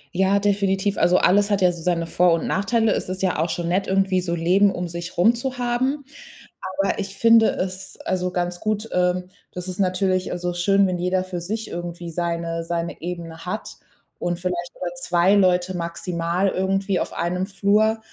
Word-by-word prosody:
Ja, 190 +2 +3
definitiv. 200 -1 +1
Also, 180 +1 +4
alles 205 +2 +4
hat 200 -1 +1
ja 180 -1 +5
so 170 -2 -8
seine 170 -1 0
Vor 175 +1 +3
und 165 - -1
Nachteile. 220 +3 +1
Es - - -2
ist 185 +1 -4
ja 185 -4 +1
auch 165 +2 +1
schon 170 -1 -2
nett 185 +3 0
irgendwie, 190 -1 +2
so 170 -1 -2
Leben 185 +4 +3
um 180 -2 -4
sich 170 +1 -7
rum 215 +7 +5
zu 255 +2 -4
haben. 255 +4 -1 0.7
Aber 195 +1 +1
ich 195 -1 -5
finde 230 0 +6
es 190 +1 -4
also 180 -1 0
ganz 175 -1 -2
gut 215 +1 -2
ähm, 180 0 +1 0.2
das 180 0 -6
ist 185 +2 -6
natürlich 185 -1 +1
also 175 0 -2
schön, 195 +3 +3
wenn 180 -1 -2
jeder 185 +1 0
für 185 -2 -5
sich 215 +5 -4
irgendwie 175 0 -6
seine 170 0 -2
seine 170 0 -4
Ebene 165 -1 -6
hat 210 +4 -5 0.4
und 175 0 -2
vielleicht 175 -1 -3
oder 175 -1 -3
2 175 +2 +2
Leute 185 -2 +2
maximal 170 +1 -1
irgendwie 195 +1 0
auf - - -3
einem 180 +2 -1
Flur. 210 +3 +2
180 Hz, 190 wpm, -23 LUFS, 175-195 Hz, 0.7 s, finde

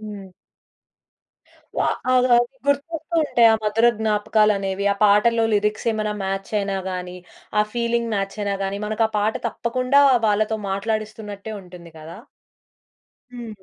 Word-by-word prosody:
హ్మ్. 205 -3 -9 1.5
వా - - +2 0.2
అ - - +3 0.2
ఆ! - - +7 0.3
గుర్తొస్తూ 305 +3 -2
ఉంటాయి 240 -6 +4
ఆ - - +4
మధుర 215 +2 +2
జ్ఞాపకాలనేవి. 210 -2 +1
ఆ - - -3
పాటల్లో 215 +3 +4
లిరిక్స్ 210 +2 0
ఏమైన 215 -1 -2
మ్యాచ్ 195 0 -4
అయినా 200 -1 -2
గాని, 180 -1 -6 0.4
ఆ - - +5
ఫీలింగ్ 235 -1 -1
మ్యాచ్ 195 0 -3
అయినా 200 -1 -1
గాని 195 +1 -3
మనకు 215 +1 0
ఆ - - -20
పాట 210 +1 +1 0.2
తప్పకుండా 255 +4 +1 0.2
వాళ్ళతో 215 +1 +1
మాట్లాడిస్తున్నట్టే 215 0 -4
ఉంటుంది 175 -2 -13
గదా! 160 +4 -10 1.1
హ్మ్. 225 -5 -9
210 Hz, 130 wpm, -22 LUFS, 200-230 Hz, 1.5 s, ఆ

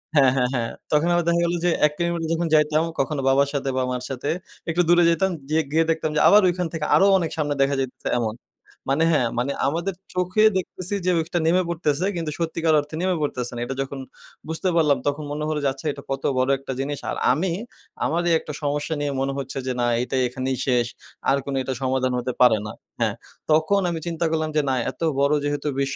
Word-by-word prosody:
হ্যাঁ, 135 -3 +6
হ্যাঁ, 125 -1 +2
হ্যাঁ। 115 -2 -1 0.2
তখন 150 +2 +3
আবার 175 0 +2
দেখা 170 0 +3
গেল 170 - 0
যে 175 - +4 0.2
১ - - -7
কিলোমিটার 170 -1 -1
যখন 165 +1 0
যাইতাম, 155 +1 +4 0.2
কখনো 140 +1 0
বাবার 140 +1 +3
সাথে 140 -1 -1
বা 130 - +2
মার 125 0 -3
সাথে 135 +2 -3 0.4
একটু 175 +2 +2
দূরে 175 0 +6
যাইতাম। 190 +3 +2 0.2
জিয়ে 160 +1 +2
গিয়ে 160 +2 +3
দেখতাম 160 -1 -1
যে 150 - +3
আবার 210 +1 +7
ঐখান 180 -1 -1
থেকে 155 -2 -2
আরো 195 - +5
অনেক 165 -3 -2
সামনে 145 -2 0
দেখা 140 +1 +2
যাইতেছে 130 -1 -3
এমন। 110 -2 -2 0.5
মানি 150 +4 +3
হ্যাঁ, 135 -7 +3
মানি 130 +3 0 0.2
আমাদের 170 +6 -1 0.2
চোখে 180 +3 +1
দেখতেছি 185 +1 -4
যে 185 - +3
ওইটা 170 +2 -1
নেমে 180 +3 +4
পড়তেছে 160 -1 0
কিন্তু 165 -3 -3
সত্যিকার 165 -1 0
অর্থে 150 +2 -6
নেমে 185 -1 +1
পড়তেছে 125 -4 -2
না। 120 - -5
এটা 135 - -4
যখন 135 0 -5 0.5
বুঝতে 160 +4 -1
পারলাম 150 -4 +4
তখন 145 +1 -1
মনে 150 +1 -3
হলো 155 -1 -1
যে 140 - +2
আচ্ছা, 135 - -13
এটা 140 - -11
কত 135 0 -3
বড় 130 +1 +2
একটা 135 - -6
জিনিস। 145 +1 -2
আর - - -3 0.2
আমি 170 +6 -1 0.5
আমারই 170 +1 +1
একটা 150 - -8
সমস্যা 145 +2 -1
নিয়ে 145 - -1
মনে 135 0 -1
হচ্ছে 135 0 -5
যে 130 - 0
না - - +2 0.2
এইটা 125 - -3
এখানেই 130 +1 -3
শেষ। 120 -2 +2 0.4
আর 140 - +4
কোনো 140 -1 -2
এটা 130 +1 -2
সমাধান 130 -1 0
হতে 125 +1 -3
পারে 120 -3 +6
না। - - -6 0.3
হ্যাঁ, - - +1 0.4
তখন 160 +6 +3
আমি 170 -1 -3
চিন্তা 170 0 -1
করলাম 160 -1 0
যে - - +5
না 130 - +2 0.2
এত - - -26 0.2
বড় 140 +1 +3
যেহেতু 145 0 -2
বিশ্ব 140 0 -1
150 Hz, 220 wpm, -23 LUFS, 135-170 Hz, 0.5 s, আবার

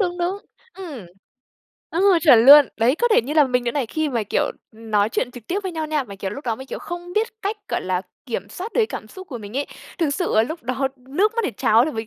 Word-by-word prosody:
đúng, 355 -3 -1
đúng. 360 +3 -1 0.4
Ừm, 305 - -8 0.8
ồ, 370 +1 +4
chuẩn 250 -7 +6
luôn. 290 0 +10
Đấy, 235 +4 +3
có 480 - +2
thể 430 - +4
như 285 +6 -4
là 300 - +6
mình 250 -2 0
nữa 235 - 0
này 280 -5 -1
khi 315 +6 -1
mà, 240 -5 -1
kiểu, 205 - 0 0.3
ừm, 220 0 -12
nói 205 0 +3
chuyện 245 +2 -2
trực 245 -3 -12
tiếp 375 - -1
với 375 - -4
nhau 320 -1 -3
nha, 300 -3 -1
mà, 200 - -10
kiểu, 195 0 -4
lúc 280 +8 -8
đó 225 -2 0
mình, 265 - -10
kiểu, - - -6
không 350 0 -7
biết 440 +2 +1
cách, 410 +2 -1
gọi - - -1
là, 185 0 -1 0.2
kiểm 200 -4 -4
soát 375 - -7
được - - -2
cái 445 - +4
cảm - - -7
xúc 375 -1 -11
của 245 -5 -6
mình 210 +4 -8
ấy, 285 - -1 0.3
thực 320 -4 +1
sự 350 +5 -1
là 220 - +6
lúc 315 +7 -5
đó 260 +2 -1
nước 300 - 0
mắt 465 - +1
để - - 0
tráo 220 +3 +3
đ - - -2
vì - - -4
mình 220 -1 -4
280 Hz, 285 wpm, -22 LUFS, 230-350 Hz, 0.8 s, luôn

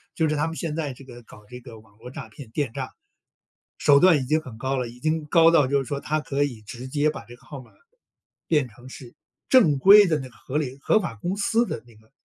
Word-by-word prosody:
就 160 -2 +1
是 155 - 0
他 150 +2 0
们 165 - -6
现 160 -3 -4
在 150 -5 -3
这 135 - -15
个 120 -2 -13
搞 105 -2 -17
这 125 +4 -11
个 120 -3 -13
网 105 -1 -23
络 125 +3 -11
诈 135 -6 -9
骗 115 +1 -12
电 140 -2 -2
诈， - - -6 0.8
手 140 -1 +5
段 180 -2 +5
已 135 - -3
经 155 +5 +1
很 130 -8 -11
高 130 +3 -2
了， 125 -2 -2
已 120 +1 -13
经 155 +1 -1
高 165 +2 +5
到 150 -5 +4
就 140 +1 +1
是 - - -7
说 140 -1 -3
它 155 +2 -2
可 145 -1 -1
以 120 -6 -5
直 120 +4 -9
接 145 +2 +1
把 - - -8
这 120 - -13
个 - - -25
号 140 -3 -9
码， 120 - -19 0.8
变 150 -6 +1
成 120 +4 -16
是 130 -2 -12 0.3
正 195 - +5
规 200 +6 +8
的 160 -4 0
那 130 -2 -8
个 120 - -23
合 135 - -5
理 135 -3 -3
合 215 - +3
法 160 - -5
公 175 - -4
司 230 +3 +1
的 115 - -5
那 120 -2 -19
个 110 +1 -24
140 Hz, 285 characters per minute, -24 LUFS, 120-155 Hz, 0.8 s, 规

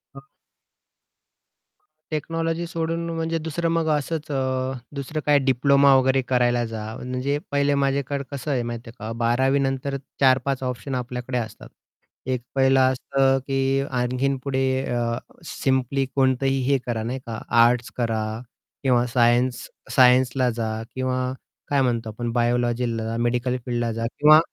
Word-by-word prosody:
हं. 135 - -10 1.9
टेक्नॉलॉजी 165 +2 -2
सोडून 165 0 -2
म्हणजे 165 0 -1
दुसरं 165 +2 -2
मग 165 -1 +1
असंच 155 +2 -4
अ, 130 -1 -1 0.2
दुसरं 140 +3 -4
काही 145 -1 +5
डिप्लोमा 140 +2 +5
वगैरे 130 0 +3
करायला 120 -1 +1
जा, 110 -1 -5
म्हणजे 130 +3 -2
पहिले 140 0 +2
माझ्याकडे 140 0 -1
कसं 140 +1 -4
आहे 125 -3 0
माहिती 120 0 -6
आहे 115 - -13
का, 110 +2 -5
12वी 130 +4 +2
नंतर 135 0 -1 0.2
4-5 135 0 +3
ऑप्शन 130 +1 -3
आपल्याकडे 125 0 -3
असतात, 110 -3 -6 0.6
एक 130 -1 -1
पहिलं 135 0 +4
असतं 135 +1 +1
की 135 0 +1
आणखीन 125 +2 0
पुढे 135 -1 0 0.2
अ, 120 -1 -1 0.3
सिंपली 135 -1 0
कोणतंही 135 0 +2
हे 140 - +4
करा 115 -3 -2
नाही 125 +4 -3
का, 115 -2 -6 0.2
आर्ट्स 120 0 +2
करा 115 -3 0 0.6
किंवा 125 -2 +3
सायन्स 120 +1 +2 0.3
सायन्सला 125 0 +5
जा 110 -1 -2
किंवा 130 0 -1 0.4
काय 140 -1 +2
म्हणतो 115 -3 0
आपण 115 +2 -4
बायोलॉजीला, 120 -1 0
मेडिकल 120 +1 0
फील्डला 120 -2 -1
जा 115 +1 -3
किंवा 155 +1 +8
130 Hz, 135 wpm, -23 LUFS, 120-140 Hz, 1.9 s, किंवा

